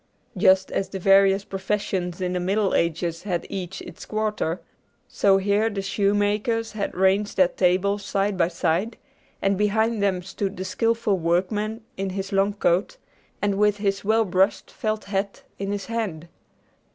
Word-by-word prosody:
Just 190 0 +4
as 195 - -1
the 195 - -5
various 195 +1 +4
professions 190 -2 -2
in 180 0 -1
the 180 - 0
Middle 195 +2 +1
Ages 170 0 0
had 180 -4 -2
each 190 -1 -5
its - - -10
quarter, 215 -6 -2 0.5
so 195 -1 +3
here 205 +3 +2
the 200 -2 -4
shoemakers 205 +3 0
had 210 -2 -4
ranged 190 +3 +2
their 185 -2 +5
tables 195 +3 +1
side 200 0 0
by 170 -2 +2
side, 175 +5 -1 0.5
and 195 0 +2
behind 220 +1 +1
them 190 -3 +1
stood 195 +2 -4
the 185 - -4
skillful 225 0 0
workman 205 +7 -1
in 195 0 -2
his 190 +1 -4
long 195 +1 +2
coat, 190 - +1 0.5
and 200 -1 +1
with 210 -1 +3
his 200 -1 -1
well 220 +2 +3
brushed 190 +2 +1
felt 215 -1 -2
hat 200 0 -3 0.2
in 195 0 -2
his 205 -1 -3
hand. 205 -9 -3
195 Hz, 160 wpm, -24 LUFS, 185-210 Hz, 0.5 s, their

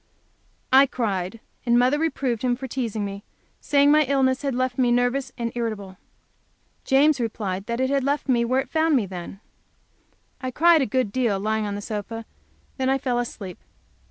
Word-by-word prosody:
I 270 +1 +8
cried, 205 -4 -2 0.2
and 240 -1 +3
mother 255 +4 +3
reproved 270 -7 -1
him 250 -1 +1
for 265 +1 -7
teasing 225 -5 -3
me, 200 0 -6 0.4
saying 285 0 +3
my 305 +1 +6
illness 260 -1 +1
had 275 -3 -2
left 255 +1 -1
me 245 -2 +3
nervous 245 +2 +1
and 235 -1 -2
irritable. 215 -5 -4 0.9
James 285 +1 +4
replied 205 -4 -3
that 235 +1 -2
it 260 +1 +1
had 275 -1 +1
left 285 +2 -1
me 240 -3 +3
where 255 +3 +1
it - - -10
found 320 -1 +2
me, 235 -6 +2
then. 185 +1 -8 1.0
I 255 - -2
cried 325 +4 +4
a 270 - +1
good 250 -1 -1
while, 235 -6 +1
lying 215 +1 -1
on 200 - -3
the 205 - -5
sofa, 210 +1 -5
and 225 0 -7 0.5
then 260 0 +1
I 270 - +3
fell 250 -3 -1
asleep. 200 -6 -6
245 Hz, 185 wpm, -24 LUFS, 215-270 Hz, 1.0 s, I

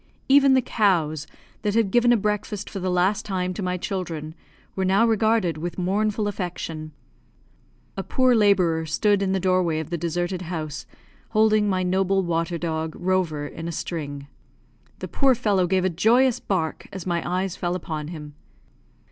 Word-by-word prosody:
Even 275 0 +6
the 260 - +3
cows, 165 -10 +1 0.3
that 205 0 -1
had 225 -4 +2
given 240 +2 +4
a 240 - +5
breakfast 210 -1 -2
for 195 - -5
the 185 0 -2
last 180 +3 +1
time 185 -2 -2
to 190 - -5
my 180 -1 -1
children, 170 -5 -4 0.4
were 190 - -1
now 195 +4 +3
regarded 220 -7 +2
with 175 +2 -5
mournful 205 +3 0
affection. 170 -5 -5 1.0
A - - -2
poor 255 -2 +2
labourer 180 -7 +3
stood 205 +5 +2
in 195 -1 0
the 190 - +1
doorway 185 -3 +1
of 160 +1 -6
the 170 - -2
deserted 175 +2 -2
house, 160 -4 -5 0.4
holding 215 -1 +3
my 185 -1 0
noble 190 +1 +1
water 170 0 -1
dog, 160 -1 -3
Rover, 175 -5 0
in 165 +3 -7
a - - -3
string. 145 -4 -5 0.7
The - - -6
poor 270 -2 +3
fellow 205 -6 +1
gave 185 0 +1
a - - +4
joyous 225 +8 +3
bark 165 -5 -2
as 190 -3 -7
my 170 -2 0
eyes 185 +1 -2
fell 175 -2 -2
upon 155 -4 -4
him. 150 -3 -8
185 Hz, 170 wpm, -24 LUFS, 165-205 Hz, 1.0 s, Even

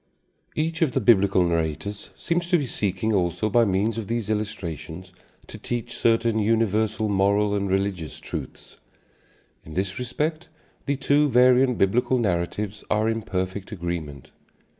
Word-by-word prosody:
Each 160 +1 -2
of 150 -7 +2
the - - +2
Biblical 100 -5 +4
narrators 85 +4 -2
seems 170 0 -1
to 175 - +5
be 145 - -1
seeking 105 -2 -1
also 95 +3 0
by 120 +1 +4
means 105 +3 0
of 105 - -6
these 115 -1 -2
illustrations 95 -4 -5 0.3
to - - -10
teach 120 -2 -4
certain 115 -1 +2
universal 110 0 +1
moral 100 +1 +2
and 100 -1 -1
religious 95 -5 -2
truths. - - -8 0.9
In 80 - -11
this 95 +3 -2
respect 155 +7 -3 0.4
the 140 - +1
two 145 +2 +2
variant 125 0 +4
Biblical 120 +6 +2
narratives 100 0 -2
are 105 +1 +2
in 115 0 0
perfect 95 +1 -4
agreement. 85 - -5
105 Hz, 140 wpm, -24 LUFS, 95-120 Hz, 0.9 s, to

